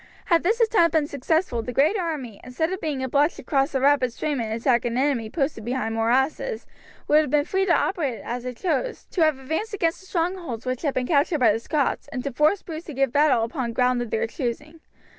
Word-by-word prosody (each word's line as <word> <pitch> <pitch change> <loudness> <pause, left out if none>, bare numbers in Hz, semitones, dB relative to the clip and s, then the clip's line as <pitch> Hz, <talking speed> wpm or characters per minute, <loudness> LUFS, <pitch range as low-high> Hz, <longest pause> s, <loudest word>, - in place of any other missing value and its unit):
Had 335 -2 +3
this 435 +7 +1
attempt 425 -8 +3
been 315 -2 +3
successful, 290 -2 -1
the 245 - -5
great 290 - +3
army, 300 - -4
instead 320 +8 -2
of 375 - -5
being 290 -4 -2
obliged 285 +5 +2
to - - -10
cross 275 0 0
a - - +3
rapid 270 -2 +3
stream 285 +1 -2
and 220 -1 -3
attack 235 +2 +1
an 240 0 -2
enemy 260 -5 0
posted 275 -4 -2
behind 240 -1 -2
morasses, 265 - 0 0.4
would 300 - +5
have 300 - -3
been 290 +1 +2
free 385 +2 0
to - - +3
operate 280 - -1
as 240 +1 -4
it 250 -1 -6
chose, - - -2
to 360 - -1
have 310 -3 +3
advanced 320 +11 -3
against 335 -4 0
the 380 - -16
strongholds 335 - -3
which 255 -1 -2
had 290 -4 -1
been 255 - 0
captured 295 +2 +2
by 235 -4 +5
the 225 - -2
Scots, 285 +3 -1
and 250 -2 -5
to 280 - -4
force 305 +9 +2
Bruce 325 0 -7
to 305 - -8
give 270 -2 +1
battle 285 -6 +4
upon 235 0 -3
ground 250 0 +2
of 240 - -4
their 220 - 0
choosing. 280 +6 -5
280 Hz, 230 wpm, -24 LUFS, 245-325 Hz, 0.4 s, would